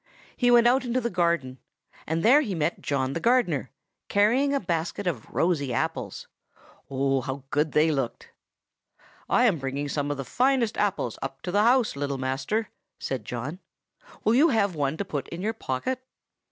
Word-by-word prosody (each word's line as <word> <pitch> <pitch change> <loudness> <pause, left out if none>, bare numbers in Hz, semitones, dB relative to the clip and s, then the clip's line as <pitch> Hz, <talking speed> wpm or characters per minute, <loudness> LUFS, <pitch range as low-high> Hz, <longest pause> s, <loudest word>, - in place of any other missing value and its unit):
He 245 - +2
went 240 -1 +6
out 255 +3 +4
into 245 0 0
the 235 -1 -2
garden, 170 -8 0 0.5
and 165 +1 -1
there 265 +7 +6
he 210 -10 -3
met 160 +1 -1
John 135 -2 -1
the 165 - -2
gardener, 180 - +2 0.4
carrying 235 +8 +3
a 280 - +1
basket 170 0 -2
of 155 -11 -3
rosy 155 -6 0
apples. 115 - -3 0.6
Oh! 135 0 +1
how 135 +1 -5
good 150 +1 +1
they 155 +1 +4
looked! 135 -5 -3 1.0
"'I 245 - +4
am 195 -10 +3
bringing 135 +2 -3
some 145 0 -1
of 145 - -2
the 135 - -5
finest 250 - +1
apples 190 - -1
up 135 0 -6
to 180 - -3
the 205 +2 +3
house, 245 - +3
little 140 -1 -2
master,' 135 - -2 0.3
said 130 -6 -4
John. 130 +10 -5 0.6
'Will 220 - +3
you 295 +7 +5
have 205 - +2
one 145 -1 -1
to 200 - -3
put 145 -7 -4
in 170 +2 -6
your 220 +2 0
pocket? 225 - -3
165 Hz, 180 wpm, -26 LUFS, 135-230 Hz, 1.0 s, went